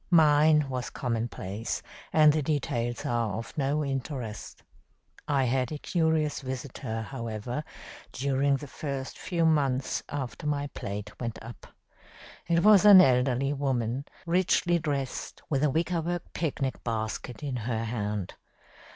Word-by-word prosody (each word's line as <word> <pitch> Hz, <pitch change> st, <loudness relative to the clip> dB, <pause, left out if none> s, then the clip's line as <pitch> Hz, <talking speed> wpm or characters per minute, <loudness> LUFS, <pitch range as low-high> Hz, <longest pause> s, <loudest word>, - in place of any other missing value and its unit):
Mine 155 Hz, -2 st, +5 dB
was 125 Hz, -2 st, -3 dB
commonplace, 115 Hz, -4 st, -3 dB, 0.3 s
and 155 Hz, -1 st, +6 dB
the 155 Hz, -, +1 dB
details 120 Hz, -5 st, -1 dB
are 115 Hz, -4 st, 0 dB
of 115 Hz, -, -7 dB
no 145 Hz, 0 st, 0 dB
interest. 130 Hz, -5 st, -5 dB, 0.6 s
I 140 Hz, -2 st, +2 dB
had 130 Hz, +1 st, 0 dB
a 155 Hz, -, -3 dB
curious 160 Hz, -2 st, +1 dB
visitor, 130 Hz, -3 st, -5 dB
however, 115 Hz, +2 st, -4 dB, 0.5 s
during 140 Hz, +1 st, +1 dB
the 145 Hz, -, -8 dB
first 140 Hz, -1 st, -5 dB
few 170 Hz, -2 st, 0 dB
months 140 Hz, -5 st, +1 dB
after 145 Hz, +2 st, -4 dB
my 145 Hz, -1 st, 0 dB
plate 105 Hz, +1 st, -5 dB
went 115 Hz, -2 st, -3 dB
up. 115 Hz, +1 st, -10 dB, 0.8 s
It 170 Hz, 0 st, +2 dB
was 210 Hz, -2 st, +7 dB
an 205 Hz, -2 st, +10 dB
elderly 130 Hz, -2 st, +3 dB
woman, 135 Hz, -2 st, -1 dB, 0.2 s
richly 175 Hz, 0 st, +2 dB
dressed, 140 Hz, -4 st, -3 dB
with 140 Hz, -1 st, +1 dB
a 150 Hz, -, +4 dB
wickerwork 170 Hz, +2 st, -1 dB
picnic 140 Hz, -5 st, -2 dB
basket 110 Hz, +2 st, -3 dB
in 135 Hz, -3 st, -2 dB
her 115 Hz, -1 st, -2 dB
hand. 105 Hz, -4 st, -3 dB
135 Hz, 130 wpm, -28 LUFS, 120-150 Hz, 0.8 s, an